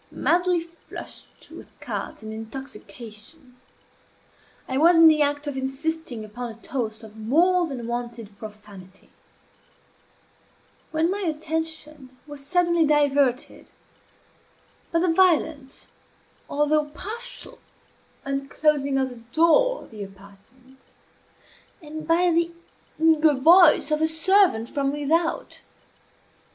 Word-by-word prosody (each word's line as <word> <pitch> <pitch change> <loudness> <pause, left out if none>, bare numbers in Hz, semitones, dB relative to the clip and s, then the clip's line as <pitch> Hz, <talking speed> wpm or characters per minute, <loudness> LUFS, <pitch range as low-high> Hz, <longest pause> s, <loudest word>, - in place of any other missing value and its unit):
Madly 355 0 +1
flushed 335 0 -11
with - - -11
cards - - -6
and 220 0 -7
intoxication, 250 +2 -9 1.1
I 260 +1 -1
was 335 +2 +6
in 330 0 +8
the 310 -1 +5
act 290 0 0
of 290 -2 -4
insisting 270 -2 -4
upon 240 +3 -7
a 225 - -9
toast 225 -1 -4
of 220 0 -13
more 340 +11 +2
than 255 -6 -6
wonted 235 -3 -5
profanity, 205 -3 -13 1.8
when 320 +2 0
my 400 - -2
attention 315 -5 -4
was 290 -2 -10
suddenly 345 +2 +2
diverted 285 -3 +1 1.2
by 335 - +1
the 365 - +2
violent, 315 -6 +1 0.6
although 295 +1 +1
partial, 435 +11 -7 0.7
unclosing 275 0 0
of 265 -1 0
the 245 - -11
door 335 - +2
of - - -17
the 215 -2 -9
apartment, 200 +7 -17 1.0
and 310 -2 -9
by 345 +2 +3
the 335 0 +1 0.5
eager 315 -2 +4
voice 320 +2 +6
of 305 0 +1
a 315 - +3
servant 320 - +3
from 275 +1 -1
without. 310 +4 -1
290 Hz, 110 wpm, -24 LUFS, 245-325 Hz, 1.8 s, in